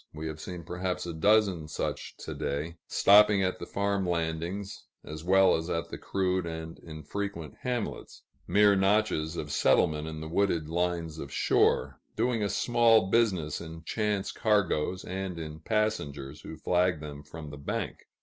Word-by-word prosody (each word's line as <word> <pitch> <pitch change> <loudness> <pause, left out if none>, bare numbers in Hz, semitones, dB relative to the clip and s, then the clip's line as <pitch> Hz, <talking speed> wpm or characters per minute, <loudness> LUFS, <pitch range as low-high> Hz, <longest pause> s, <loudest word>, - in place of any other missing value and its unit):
We 75 +1 -6
have 80 0 -7
seen 90 -2 -7
perhaps 90 +2 -3
a 85 - -4
dozen 95 -2 +3
such 75 - -4
to - - -5
day, 75 +4 -3
stopping 105 -1 +6
at 95 0 -1
the - - -7
farm 100 0 0
landings 85 +4 -3 0.2
as 75 +1 -7
well 95 +1 +5
as 80 +2 -3
at 85 -1 -2
the - - -7
crude 95 -2 -1
and 80 0 -6
infrequent 85 +2 -6
hamlets, 125 -3 -4 0.2
mere 105 0 +5
notches 95 -5 +2
of 75 -3 -4
settlement 75 +1 +2
in 80 -1 -6
the 80 - -6
wooded 85 -2 +1
lines 85 -2 -1
of 70 - -7
shore, - - +2 0.2
doing 115 0 +1
a 100 - 0
small 115 -5 +3
business 95 -10 +1
in 80 -1 -9
chance 105 0 -1
cargoes 95 -5 +1
and 95 -1 -4
in 80 -1 -6
passengers 75 -9 -2
who 80 - -9
flag 90 0 +1
them 75 -1 -8
from 75 +1 -9
the 70 - -8
bank. 70 - -4
90 Hz, 160 wpm, -29 LUFS, 80-100 Hz, 0.2 s, stopping